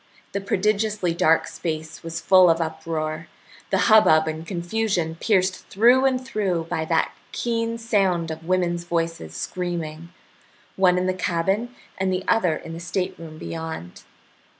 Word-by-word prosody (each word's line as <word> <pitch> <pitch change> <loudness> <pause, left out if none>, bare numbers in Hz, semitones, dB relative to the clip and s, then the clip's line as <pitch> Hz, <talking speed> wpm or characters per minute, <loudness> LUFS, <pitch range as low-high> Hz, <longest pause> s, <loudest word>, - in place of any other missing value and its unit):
The 200 - -2
prodigiously 205 -2 0
dark 165 -1 +3
space 160 -1 -5
was 165 0 -5
full 185 0 +6
of 165 0 +3
uproar, 160 0 -3 0.4
the - - +2
hubbub 185 -8 +6
and 160 +1 -4
confusion 175 -1 -1
pierced 185 +1 0
through 245 +6 +4
and 260 -1 +2
through 195 -9 -1
by 160 - -1
that 160 0 +1 0.2
keen 230 -1 -1
sound 195 -8 +1
of 160 0 -7
women's 175 -2 +1
voices 165 - -3
screaming, 170 - -4 0.7
one 180 -1 +4
in 180 - 0
the 185 - +1
cabin 190 +7 -1 0.2
and 190 0 +1
the 185 0 -1
other 185 -8 +3
in 165 - -8
the 165 - -6
stateroom 170 -2 -4
beyond. 160 - -6
175 Hz, 145 wpm, -23 LUFS, 160-195 Hz, 0.7 s, full